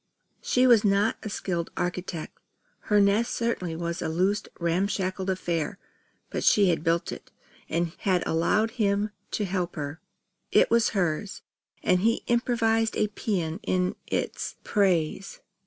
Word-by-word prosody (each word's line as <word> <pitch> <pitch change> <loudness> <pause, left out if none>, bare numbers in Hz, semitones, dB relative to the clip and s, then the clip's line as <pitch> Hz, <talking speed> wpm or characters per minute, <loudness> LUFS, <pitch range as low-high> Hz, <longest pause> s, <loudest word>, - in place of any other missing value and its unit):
She 250 +1 +2
was 235 -4 +6
not 205 +2 +2
a 215 - -5
skilled 175 -4 -3
architect. 175 -2 -3 0.5
Her 210 -1 +4
nest 205 +4 +3
certainly 185 -8 -1
was 170 +1 -3
a - - -1
loose 185 +6 +1 0.2
ramshackle 185 +2 -1
affair; 175 -1 -1 0.5
but - - -2
she 200 -3 +5
had 165 -2 0
built 165 0 +1
it, - - -9 0.4
and 165 +1 0
had 185 -3 +1
allowed 205 +7 +2
him 205 +1 +1 0.2
to 210 - -1
help 180 -2 -2
her. 145 +1 -5 0.5
It - - +4
was 235 -1 +4
hers; 180 +2 -1 0.4
and 180 - +3
he 230 +5 +1
improvised 230 -2 +1
a 210 - +1
paean 180 -5 -2
in 180 0 0
its - - -2
praise. 190 -3 0
190 Hz, 140 wpm, -27 LUFS, 170-210 Hz, 0.5 s, was